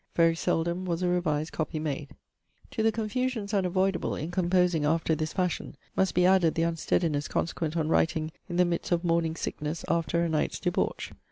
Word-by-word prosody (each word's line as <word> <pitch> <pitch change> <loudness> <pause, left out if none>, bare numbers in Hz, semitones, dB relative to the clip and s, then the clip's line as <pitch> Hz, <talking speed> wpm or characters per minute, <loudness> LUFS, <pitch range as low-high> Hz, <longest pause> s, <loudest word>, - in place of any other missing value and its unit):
Very 165 -1 +5
seldom 170 +2 0
was 175 0 -1
a - - +2
revised 160 -4 0
copy 155 0 -3
made. 145 -2 -4 0.6
To 220 - -2
the 220 0 +4
confusions 225 -1 -2
unavoidable 190 -1 +1
in 160 +3 -4
composing 180 -2 +2
after 160 +2 +2
this 155 0 -2
fashion, 180 -2 -2 0.2
must 190 - +1
be 180 - +4
added 185 -3 +4
the 165 - +1
unsteadiness 165 -2 0
consequent 165 -1 -2
on 155 -2 0
writing 160 -1 +1 0.2
in 175 - -3
the 180 - +5
midst 170 +1 -2
of 175 0 +2
morning 165 -2 +1
sickness 155 0 -4
after 170 0 +1
a - - +1
night's 155 -2 -1
debauch. - - -1
170 Hz, 180 wpm, -28 LUFS, 160-180 Hz, 0.6 s, Very